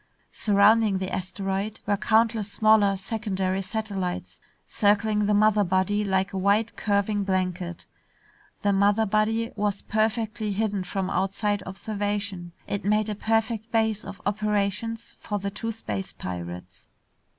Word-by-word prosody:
Surrounding 210 0 +4
the 190 0 -4
asteroid 195 +2 -3
were 205 - +2
countless 220 0 +2
smaller 215 -2 +4
secondary 190 -2 -2
satellites 195 -2 -4 0.3
circling 210 0 +2
the 210 - +3
mother 210 0 +4
body 190 +3 +1
like 190 0 0
a 190 - -1
wide 205 +4 +2
curving 205 0 0
blanket. 185 -2 -2 0.8
The 200 -1 +3
mother 205 +3 +3
body 220 +2 +1
was 205 -1 -1
perfectly 220 0 0
hidden 205 -2 -1
from 190 +1 -2
outside 195 +2 0
observation. 200 -2 -3
It 200 - -3
made 210 +2 +2
a - - -1
perfect 225 +1 0
base 220 -2 +1
of 195 - -8
operations 210 +2 -1
for 210 - -3
the 200 0 -3
two 225 +3 -3
space 105 - -5
pirates. 90 +1 -7
205 Hz, 130 wpm, -26 LUFS, 190-215 Hz, 0.8 s, Surrounding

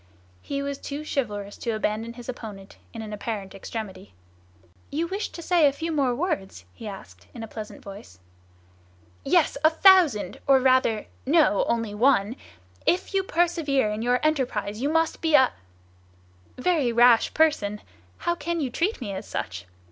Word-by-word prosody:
He 280 0 -4
was 280 0 -4
too 290 +2 -6
chivalrous 205 -8 -3
to 230 -2 -2
abandon 215 +2 -2
his 240 -1 -11
opponent 210 -6 -8
in 225 -1 -7
an 215 -1 -7
apparent 205 -2 -5
extremity. 195 - -7 0.7
"You 315 +4 -1
wished 390 +5 -4
to 335 - -7
say 340 -3 +4
a - - +3
few 325 +4 -4
more 275 -5 +1
words?" 195 - -3
he 220 - -9
asked, 95 - -10
in 230 - -6
a - - -6
pleasant 215 0 -9
voice. 195 - -11 1.0
"Yes, 280 - +2
a 315 - +7
thousand; 330 - +4
or 270 -1 +6
rather, 255 -4 +2 0.2
no, 295 - +4
only 230 -3 -1
one! 230 -1 +2 0.5
If 360 +3 +1
you 390 - +3
persevere 325 - +1
in 210 +1 -3
your 245 +1 +2
enterprise, 245 -8 -1
you 280 - +1
must 325 +1 +1
be 320 -2 +3
a—" 260 -2 +5 1.0
"Very 285 -3 +1
rash 235 0 +5
person! 255 -11 +2 0.4
How 345 - 0
can 340 +1 -3
you 270 -5 -2
treat 345 - -1
me 205 -5 -4
as 190 - -6
such? 90 -1 -5
245 Hz, 165 wpm, -25 LUFS, 210-310 Hz, 1.0 s, a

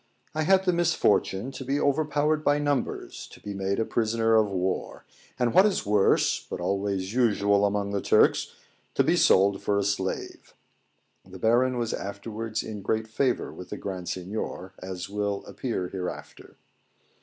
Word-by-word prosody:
I 155 - -1
had 190 +4 +3
the 180 - +3
misfortune 135 - +1
to 135 - -7
be 135 +2 -1
overpowered 150 +1 +1
by 145 0 +3
numbers, 145 -4 -2
to - - -13
be 100 - -6
made 100 +3 -1
prisoner 115 0 +2
of 110 -2 +4
war; 95 -1 -3 0.3
and, 120 -2 +1
what 190 +3 +7
is 200 - -1
worse, 105 -1 +3
but - - -4
always 100 0 -2
usual 100 -4 +3
among 100 0 -2
the 100 -1 -1
Turks, - - +3 0.4
to - - +4
be - - +3
sold 95 +1 +4
for 100 - 0
a 100 - +1
slave. 95 -1 -3 0.7
[The 95 0 -12
Baron 120 +5 +2
was 115 -2 -1
afterwards 110 +3 -4
in 105 -2 -6
great 110 +3 -1
favour 125 +3 -1
with 90 0 -10
the - - -5
Grand 95 -3 -5
Seignior, 95 0 -5
as 90 -1 -6
will 100 0 -2
appear 100 -8 -3
hereafter. 90 -2 -7
105 Hz, 160 wpm, -26 LUFS, 100-130 Hz, 0.7 s, what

